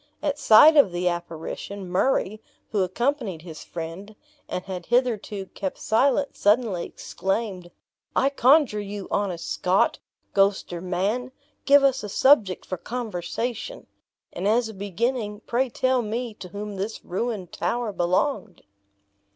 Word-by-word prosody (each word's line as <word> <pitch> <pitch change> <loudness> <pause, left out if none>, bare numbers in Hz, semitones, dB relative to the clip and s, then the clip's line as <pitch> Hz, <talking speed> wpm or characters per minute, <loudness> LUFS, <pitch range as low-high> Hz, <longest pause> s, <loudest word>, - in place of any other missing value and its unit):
At 295 -1 -1
sight 295 +9 +8
of 275 -10 +6
the 175 +1 -1
apparition, 175 +3 -4
Murray, 210 +2 0 0.3
who 205 - +1
accompanied 200 - -1
his 160 -3 -9
friend, 175 +6 -7 0.3
and 180 - -3
had 185 -2 -6
hitherto 225 -5 0
kept 190 -2 -4
silent, 275 +5 +1
suddenly 205 -4 +2
exclaimed, 190 -1 -3 0.5
"I 275 - +3
conjure 270 -4 +4
you, 205 -1 -6
honest 190 -5 -1
Scot, 185 +2 +1 0.3
ghost 195 -2 +2
or 170 - -5
man, 200 +8 -1 0.3
give 285 0 +6
us 265 -2 +2
a 210 - -5
subject 215 -5 +3
for 185 - -4
conversation! 230 - -4 0.5
and, 185 +3 -2
as 230 +2 +3
a - - -8
beginning, 210 +2 -2
pray 250 +3 0
tell 255 +1 +1
me 230 +1 -3
to 195 - -10
whom 205 +2 -6
this 205 +4 -5
ruined 195 -1 -3
tower 220 +4 -2
belonged?" 185 - -1
210 Hz, 135 wpm, -25 LUFS, 185-245 Hz, 0.5 s, sight